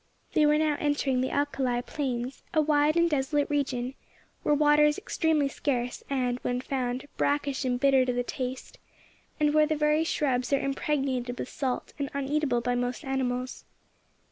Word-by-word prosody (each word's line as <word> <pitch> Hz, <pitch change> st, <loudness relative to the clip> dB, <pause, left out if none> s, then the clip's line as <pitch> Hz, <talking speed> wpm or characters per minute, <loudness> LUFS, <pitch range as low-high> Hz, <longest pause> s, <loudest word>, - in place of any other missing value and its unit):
They 305 Hz, -1 st, +4 dB
were 300 Hz, 0 st, +4 dB
now 305 Hz, -1 st, +1 dB
entering 285 Hz, -3 st, +1 dB
the 260 Hz, -, 0 dB
Alkali 270 Hz, -4 st, 0 dB
Plains, 255 Hz, -3 st, -3 dB
a -, -, +5 dB
wide 300 Hz, +1 st, +3 dB
and 340 Hz, 0 st, +4 dB
desolate 290 Hz, -1 st, 0 dB
region, 260 Hz, -3 st, -1 dB, 0.5 s
where 295 Hz, -, +2 dB
water 295 Hz, 0 st, +5 dB
is 300 Hz, 0 st, +3 dB
extremely 320 Hz, -7 st, +1 dB
scarce, 250 Hz, -3 st, -2 dB
and, 250 Hz, -3 st, 0 dB
when 245 Hz, 0 st, -2 dB
found, 255 Hz, 0 st, -3 dB
brackish 285 Hz, -1 st, 0 dB
and 245 Hz, -1 st, 0 dB
bitter 270 Hz, -1 st, +4 dB
to 250 Hz, -, 0 dB
the 245 Hz, 0 st, 0 dB
taste, 255 Hz, +1 st, -5 dB, 0.6 s
and 300 Hz, -1 st, +3 dB
where 305 Hz, 0 st, +5 dB
the 310 Hz, -, 0 dB
very 300 Hz, +1 st, +2 dB
shrubs 260 Hz, -6 st, 0 dB
are 275 Hz, -, +4 dB
impregnated 270 Hz, -3 st, -1 dB
with -, -, -5 dB
salt, 260 Hz, -3 st, -3 dB
and 280 Hz, -1 st, -2 dB
uneatable 280 Hz, -3 st, 0 dB
by 245 Hz, +1 st, 0 dB
most 245 Hz, +4 st, -2 dB
animals. 255 Hz, -1 st, -2 dB
275 Hz, 170 wpm, -28 LUFS, 250-295 Hz, 0.6 s, a